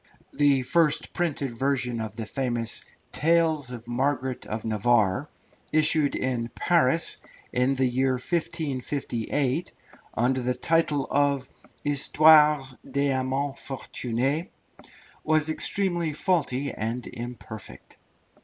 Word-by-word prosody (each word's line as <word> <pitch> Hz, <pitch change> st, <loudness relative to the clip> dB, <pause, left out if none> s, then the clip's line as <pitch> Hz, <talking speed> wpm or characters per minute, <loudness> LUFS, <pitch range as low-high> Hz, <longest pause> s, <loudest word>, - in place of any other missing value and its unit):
The 140 Hz, -3 st, +3 dB
first 155 Hz, +2 st, +2 dB
printed 145 Hz, -7 st, -2 dB
version 125 Hz, -1 st, -1 dB
of 110 Hz, -1 st, -6 dB
the 115 Hz, -, -5 dB
famous 120 Hz, -1 st, -2 dB, 0.3 s
Tales 160 Hz, -3 st, +2 dB
of 120 Hz, -2 st, -8 dB
Margaret 130 Hz, 0 st, -2 dB
of 110 Hz, +1 st, -4 dB
Navarre, 110 Hz, +3 st, +1 dB, 0.4 s
issued 155 Hz, -1 st, +5 dB
in 125 Hz, -3 st, -2 dB
Paris 165 Hz, -2 st, +2 dB, 0.4 s
in 125 Hz, +2 st, +2 dB
the 130 Hz, 0 st, +1 dB
year 130 Hz, +1 st, +1 dB
1558, 140 Hz, -1 st, -2 dB, 0.4 s
under 130 Hz, +3 st, +1 dB
the 125 Hz, +1 st, -1 dB
title 150 Hz, 0 st, +1 dB
of 140 Hz, -1 st, +1 dB, 0.4 s
"Histoires 150 Hz, -1 st, +5 dB
des 140 Hz, 0 st, -1 dB
Amans 135 Hz, +1 st, -1 dB
Fortunez," 135 Hz, +3 st, -2 dB, 0.8 s
was 155 Hz, 0 st, +2 dB
extremely 175 Hz, -1 st, 0 dB
faulty 145 Hz, -5 st, 0 dB
and 115 Hz, +3 st, -3 dB
imperfect. 120 Hz, -2 st, -9 dB
135 Hz, 105 wpm, -26 LUFS, 125-150 Hz, 0.8 s, issued